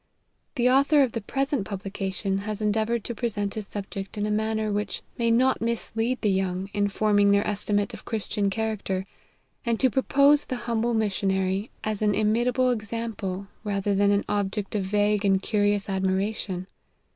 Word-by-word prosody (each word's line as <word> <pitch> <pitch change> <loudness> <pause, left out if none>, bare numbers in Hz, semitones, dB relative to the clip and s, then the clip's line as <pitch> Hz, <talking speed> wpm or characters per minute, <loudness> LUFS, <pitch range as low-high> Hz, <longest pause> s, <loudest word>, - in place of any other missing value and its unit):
The 245 -1 +2
author 280 +3 +5
of 255 - 0
the 230 - -3
present 275 +3 -1
publication 195 0 -3
has 210 +1 -4
endea 215 0 +1
voured 235 -2 -1
to 235 - -4
present 205 -3 -2
his 215 -2 -4
subject 200 0 -6
in 205 - 0
a 210 - -1
manner 220 0 0
which 205 +1 -3 0.2
may 230 0 +2
not 255 +2 +3
mislead 230 +1 -1
the 210 - +2
young, 190 0 -1
in 205 -1 +2
forming 205 0 +3
their 200 0 +3
esti 205 0 -1
mate 205 -1 +1
of - - -9
Christian 210 -2 -1
character, 200 -3 -2 0.6
and 235 -3 0
to 260 -2 +3
propose 280 +3 +4
the 255 - -2
humble 235 0 0
missionary, 195 -1 0
as 215 -1 -2
an 210 -1 +2
imitable 240 +4 +2
example, 215 -4 -3 0.2
rather 200 -1 0
than 200 +1 +3
an 200 0 +2
object 205 0 -2
of 205 -3 -1
vague 205 +1 +1
and 195 -1 +3
curious 205 -2 +1
admiration. 190 -1 -1
210 Hz, 170 wpm, -26 LUFS, 200-230 Hz, 0.6 s, author